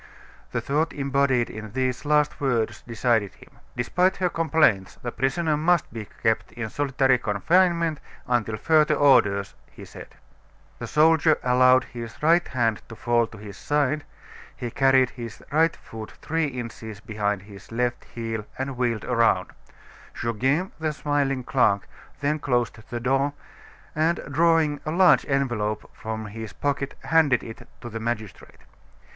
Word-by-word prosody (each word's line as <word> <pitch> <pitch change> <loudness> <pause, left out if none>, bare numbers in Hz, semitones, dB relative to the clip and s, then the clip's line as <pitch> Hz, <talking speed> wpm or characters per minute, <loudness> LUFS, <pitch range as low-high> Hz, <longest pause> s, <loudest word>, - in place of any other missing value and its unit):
The - - -1
thought 155 +4 0
embodied 140 -3 +1
in 110 -1 -8
these 130 +1 -1
last 150 0 +2
words 115 -5 0
decided 115 -3 0
him. - - -17 0.3
"Despite 180 +10 +1
her 180 -1 +1
complaints 160 - +2
the 120 - -3
prisoner 150 +6 0
must 165 -2 +1
be 110 -3 -6 0.2
kept 110 0 +1
in 115 -3 -5
solitary 135 -2 +2
confinement 165 - +2 0.3
until 110 -3 0
further 155 +4 +3
orders," 110 -9 +3 0.2
he - - -12
said. - - -12 0.6
The - - -5
soldier 160 0 +4
allowed 130 0 +5
his 115 -3 -8
right 170 +3 +4
hand 115 -4 0
to 115 - -8
fall 120 0 +1
to 110 - -13
his 100 -2 -10
side, 145 0 0 0.5
he 120 -1 -5
carried 135 -1 +3
his 115 -3 -9
right 160 +2 +3
foot 110 -1 -10
three 160 0 -1
inches 115 -5 -7
behind 105 -2 -2
his 100 0 -14
left 120 +1 -1
heel, 115 -2 -5
and 130 -1 -4
wheeled 120 -4 -1
around. 115 -6 +2 0.7
Goguet, 130 - 0
the 155 -1 -1
smiling 145 -3 -1
clerk, 110 -6 +2 0.3
then 150 +2 0
closed 120 -5 -1
the 120 - -3
door, 135 +3 +1 0.6
and, 160 +3 +1
drawing 160 -1 +3
a - - -4
large 180 +3 +4
envelope 120 -6 -1
from 110 0 -5
his 110 -1 -7
pocket, 140 -1 -2
handed 160 -5 +3
it 115 - -10
to 120 - -7
the 115 0 -5
magistrate. 110 -3 -5
125 Hz, 145 wpm, -25 LUFS, 110-150 Hz, 0.7 s, allowed